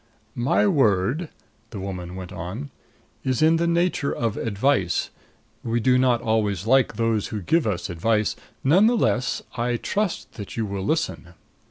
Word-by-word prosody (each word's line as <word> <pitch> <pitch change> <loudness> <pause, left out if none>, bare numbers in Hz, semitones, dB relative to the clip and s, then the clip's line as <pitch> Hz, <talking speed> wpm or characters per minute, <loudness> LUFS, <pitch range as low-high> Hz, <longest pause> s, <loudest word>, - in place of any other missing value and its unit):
"My 125 +12 +2
word," 135 - +2 0.4
the 105 - -7
woman 90 -2 -6
went 95 -1 -7
on, 110 - -6 0.5
"is 130 +2 +1
in 160 +1 +5
the 170 +1 +1
nature 170 -4 +1
of 115 -3 -1
advice. 110 -2 0 0.5
We 115 0 0
do 125 +2 +3
not 125 -2 +2
always 105 -4 0
like 130 +2 +3
those 115 -3 0
who 110 - -4
give 160 - +1
us 90 -4 -2
advice. 105 +4 0 0.3
None 180 +10 +5
the 240 +1 +3
less, 130 - 0
I 120 0 0
trust 205 - -2
that 100 -1 -8
you 115 - 0
will 100 -2 -4
listen." 100 - -2
115 Hz, 160 wpm, -24 LUFS, 100-140 Hz, 0.5 s, in